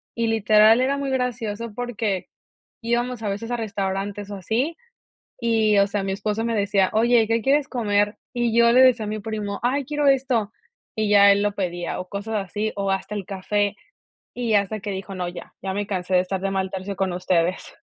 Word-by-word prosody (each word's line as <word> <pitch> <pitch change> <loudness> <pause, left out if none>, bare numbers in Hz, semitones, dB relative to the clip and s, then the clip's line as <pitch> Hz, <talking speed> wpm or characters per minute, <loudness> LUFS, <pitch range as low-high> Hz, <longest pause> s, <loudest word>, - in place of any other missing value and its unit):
y 230 -1 0
literal 220 +1 +5
era 275 +2 +1
muy 280 -1 -2
gracioso 235 -4 -2
porque 220 -6 -2 0.6
íbamos 240 +1 -1
a 210 - -2
veces 215 +4 -5
a 240 - 0
restaurantes 200 -2 -3
o 200 - -5
así 235 - -1 0.6
y, 220 -3 +3
o 200 - +5
sea 200 0 -2
mi 195 0 -2
esposo 210 +3 -2
me 230 0 -1
decía: 200 -2 +2
"Oye, 230 +1 +4
¿qué 230 0 +2
quieres 275 +2 +2
comer?", 205 -3 0 0.2
y 240 -1 0
yo 235 0 +6
le 250 - +6
decía 250 -4 +5
a - - -4
mi 215 0 -3
primo: 205 -1 -4
"Ay 270 +4 +1
quiero 295 +1 +1
esto", 255 -6 +2 0.5
y 215 -1 0
ya 200 -1 +7
él 200 - +2
lo 205 0 +1
pedía 175 -3 -3
o 180 - -7
cosas 200 +3 -5
así, 210 +3 -3
o 200 -1 -1
hasta 195 +2 -2
el 205 -2 -4
café, 205 +2 -1 0.6
y 235 -3 -1
hasta 205 +1 +1
que 205 0 -5
dijo: 195 0 -5
"No, 180 -1 -3
ya 175 -1 -10
ya 190 0 -2
me 205 +1 -2
cansé 185 -2 -2
de 180 - +6
estar 185 +1 -3
de 195 0 -1
mal 190 -1 -1
tercio 195 +1 -5
con 190 -1 -1
ustedes". 180 0 0
210 Hz, 210 wpm, -23 LUFS, 195-235 Hz, 0.6 s, ya